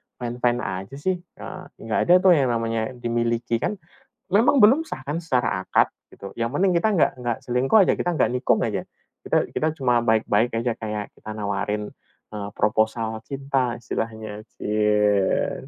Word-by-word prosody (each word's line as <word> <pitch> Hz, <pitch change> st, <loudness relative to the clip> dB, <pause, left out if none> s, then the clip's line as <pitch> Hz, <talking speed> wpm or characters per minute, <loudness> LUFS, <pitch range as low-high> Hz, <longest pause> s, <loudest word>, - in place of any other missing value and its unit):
fine-fine 120 Hz, 0 st, -1 dB
aja 95 Hz, +7 st, -5 dB
sih, 180 Hz, +6 st, -1 dB
heeh. 175 Hz, -, -10 dB, 0.2 s
Nggak 110 Hz, -1 st, -1 dB
ada 175 Hz, -, +6 dB
tuh 190 Hz, -, +7 dB
yang 145 Hz, -6 st, +4 dB
namanya 115 Hz, 0 st, -1 dB
dimiliki. 120 Hz, -1 st, -1 dB
Kan 210 Hz, -, -1 dB, 0.6 s
memang 230 Hz, +6 st, +5 dB
belum 265 Hz, +10 st, +6 dB
sah -, -, -6 dB
kan 150 Hz, +3 st, -1 dB
secara 125 Hz, -, 0 dB
akad -, -, +4 dB, 0.2 s
gitu, 100 Hz, -, -10 dB
yang 115 Hz, -, +1 dB
penting 185 Hz, +4 st, +3 dB
kita 170 Hz, -, +2 dB
nggak 165 Hz, -, +3 dB
nggak 120 Hz, -2 st, -2 dB
selingkuh 125 Hz, -, +2 dB
aja, -, -, +3 dB
kita 175 Hz, -, 0 dB
nggak -, -, +2 dB
nikung 125 Hz, -, +1 dB
aja, 105 Hz, -4 st, -1 dB, 0.5 s
kita -, -, +2 dB
kita 155 Hz, -, 0 dB
cuma 125 Hz, -3 st, +3 dB
baik-baik 110 Hz, 0 st, +2 dB
aja 120 Hz, +1 st, 0 dB
kayak 105 Hz, -2 st, -4 dB
kita -, -, -11 dB
nawarin, 105 Hz, 0 st, -2 dB, 0.4 s
eee, 105 Hz, -1 st, -5 dB
proposal 110 Hz, +1 st, 0 dB
cinta 135 Hz, -3 st, -1 dB
istilahnya, 110 Hz, -2 st, -5 dB, 0.2 s
cie. 105 Hz, -2 st, +1 dB
120 Hz, 160 wpm, -23 LUFS, 105-135 Hz, 0.6 s, tuh